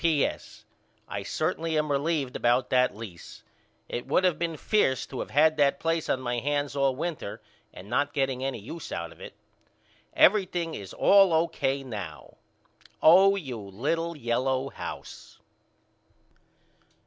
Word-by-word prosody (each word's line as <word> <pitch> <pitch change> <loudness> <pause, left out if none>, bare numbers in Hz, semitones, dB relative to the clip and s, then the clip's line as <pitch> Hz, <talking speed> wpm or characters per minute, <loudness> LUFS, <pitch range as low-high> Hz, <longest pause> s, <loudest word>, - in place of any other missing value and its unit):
P.S. 160 -4 -1 0.4
I 100 - -4
certainly 160 - -2
am 150 -1 0
relieved 140 -2 -1
about 120 +1 +1
that 125 -2 +3
lease. 105 -6 -10 0.4
It 120 - -5
would 185 - +2
of 180 -3 +1
been 165 -2 -2
fierce 135 - +1
to 130 - -6
of - - -6
had 155 +2 +4
that 140 -2 +3
place 165 -1 -1
on 130 - +1
my 120 -1 -2
hands 145 +2 -1
all 135 -2 +2
winter 155 -8 -4 0.3
and 90 - -12
not 140 +5 0
getting 135 -2 -1
any 135 -2 -2
use 135 +10 -8
out 85 -1 -4
of - - -16
it. - - -10 0.8
Everything 180 -4 +3
is 100 -2 -7
all 195 -2 +5
O.K. 160 -4 0
now. 100 - -8 0.6
Oh 190 +5 +7
you 135 - -5
little 150 - -3
yellow 130 +2 -1
house. - - -9
140 Hz, 145 wpm, -27 LUFS, 125-165 Hz, 0.8 s, Oh